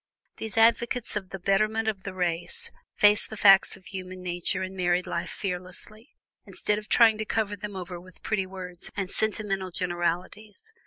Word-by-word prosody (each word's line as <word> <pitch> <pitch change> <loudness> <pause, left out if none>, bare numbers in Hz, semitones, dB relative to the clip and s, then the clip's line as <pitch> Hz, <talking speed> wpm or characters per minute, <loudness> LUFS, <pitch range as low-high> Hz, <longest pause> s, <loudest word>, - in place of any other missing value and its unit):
These 220 0 -6
advocates 235 +1 +3
of 195 -3 -3
the 195 - -5
Betterment 215 +4 +1
of 210 -3 -1
the 200 0 -6
Race 185 - -1 0.2
face 210 0 +5
the 220 - -8
facts 195 -1 +6
of 190 - -21
human 185 -2 -7
nature 175 0 -1
and 190 0 -5
married 180 -1 +1
life - - -3
fearlessly, 190 +5 -6 0.3
instead 210 0 -1
of 210 - -13
trying 225 -2 +6
to - - 0
cover 210 -1 0
them 205 0 -7
over 180 -1 -6
with 185 +1 -17
pretty 195 -3 0
words 180 -2 -8
and 195 -2 -2
sentimental 205 -3 -1
generalities. 180 - -3
195 Hz, 170 wpm, -27 LUFS, 185-215 Hz, 0.3 s, facts